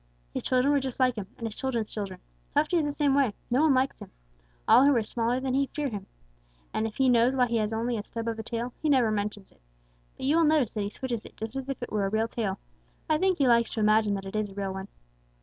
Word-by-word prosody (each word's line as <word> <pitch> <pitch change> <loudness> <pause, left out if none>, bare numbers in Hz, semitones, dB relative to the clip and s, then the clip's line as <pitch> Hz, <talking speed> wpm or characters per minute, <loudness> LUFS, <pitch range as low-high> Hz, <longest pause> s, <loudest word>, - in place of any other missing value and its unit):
His - - -2
children 255 +3 +2
were 285 - +4
just 265 -1 -5
like 255 -1 +4
him, 210 -4 -6
and 235 - -5
his 220 - -4
children's 235 -5 -2
children. 195 -4 -5 0.4
Tufty 305 +4 +3
is 315 - +2
the - - -1
same 285 -1 +1
way. 270 -7 +2 0.2
No 255 +4 +3
one 310 -4 +4
likes 260 +1 +1
him. - - -10 0.6
All 255 - +7
who 285 -1 +5
are 230 - +2
smaller 235 +3 -1
than 260 -1 -2
he 275 +1 +2
fear 295 -2 -1
him. 205 -4 -6 0.7
And 220 - 0
if 215 - -9
he 265 - +2
knows 245 +1 +4
why 250 -1 +4
he 235 -1 0
has 215 -1 0
only 230 +2 -1
a 205 - -4
stub 230 +2 -6
of 225 -1 -2
a - - -1
tail, 235 +2 -4
he 310 - +1
never 255 -6 +4
mentions 205 -1 -3
it. - - -28 0.6
But - - -5
you 295 +4 +3
will 335 - +5
notice 300 -7 +2
that 215 - -2
he 200 - -2
switches 235 0 -4
it - - -14
just 220 +3 -6
as 270 0 -4
if 275 - -3
it - - -6
were 205 -2 0
a - - -2
real 220 +2 +1
tail. 210 -5 -2 0.5
I 310 -2 +2
think 375 0 +2
he 275 - +3
likes 235 -1 +4
to - - -2
imagine 215 -1 +3
that 195 0 -5
it 195 - -7
is 215 -1 -1
a 195 - -13
real 195 -1 -3
one." 190 +1 -6
235 Hz, 280 wpm, -28 LUFS, 215-270 Hz, 0.7 s, All